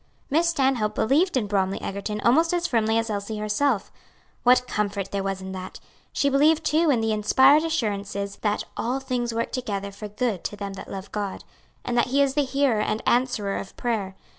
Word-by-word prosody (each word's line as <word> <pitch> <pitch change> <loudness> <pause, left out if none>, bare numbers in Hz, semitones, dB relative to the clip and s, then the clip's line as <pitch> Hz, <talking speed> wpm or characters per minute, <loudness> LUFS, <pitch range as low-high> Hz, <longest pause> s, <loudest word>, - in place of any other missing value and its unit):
Miss 335 +4 +3
Stanhope 260 -9 +1
believed 295 - +2
in 220 -5 0
Bromly 195 -1 0
Egerton 200 +2 -4
almost 320 +10 +3
as 345 0 -1
firmly 225 -6 +1
as 225 -1 -1
Elsie 205 +1 -3
herself; 215 +2 0 0.5
what 250 0 +5
comfort 200 -3 -2
there 200 - -1
was 195 -1 -3
in 190 - -6
that! 185 0 -7 0.3
She 280 - +1
believed 300 +4 +4
too 315 +2 +2
in 245 -5 +3
the 225 0 0
inspired 265 +8 +5
assurances 200 -9 -2
that 210 -1 -1
"all 250 +3 -1
things 250 -3 -2
work 230 +1 -2
together 200 -6 -3
for 205 +2 -8
good 210 -2 -2
to - - -3
them 200 -1 -5
that 195 - -9
love 195 0 -7
God," 205 -2 -4 0.4
and 245 - -2
that 240 - +2
He 270 +3 +1
is 275 -1 +3
the 295 - +2
hearer 270 -5 +1
and 215 +2 -1
answerer 240 -5 +1
of 195 - -8
prayer. 210 -6 -2
225 Hz, 195 wpm, -25 LUFS, 200-270 Hz, 0.5 s, what